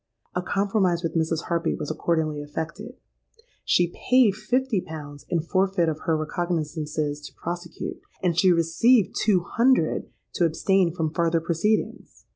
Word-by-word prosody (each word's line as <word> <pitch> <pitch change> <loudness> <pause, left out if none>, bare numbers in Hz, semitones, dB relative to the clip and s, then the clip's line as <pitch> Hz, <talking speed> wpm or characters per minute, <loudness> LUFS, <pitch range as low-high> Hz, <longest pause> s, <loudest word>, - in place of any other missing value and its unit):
A 180 - -1
compromise 195 -2 +1
with 165 -1 -2
Mrs. 160 0 0
Harpy 170 -1 -1
was 150 - -4
accordingly 155 -2 -1
effected: 165 - -6 0.7
she 175 -1 +2 0.2
paid 250 -4 +6
fifty 225 +1 0
pounds 145 -3 -9
in 170 - +1
forfeit 185 +1 +1
of 155 -1 -3
her 165 -3 +2
recognizances 155 -2 -2
to - - -17
prosecute: 175 0 -6 0.2
and 175 -2 +2
she 185 +2 +5
received 180 +7 +3
two 200 -5 +2
hundred 230 -2 +1 0.2
to 175 - +2
abstain 180 +2 +2
from 160 -2 -2
farther 165 0 +2
proceedings! 170 +6 -2
170 Hz, 140 wpm, -25 LUFS, 160-195 Hz, 0.7 s, paid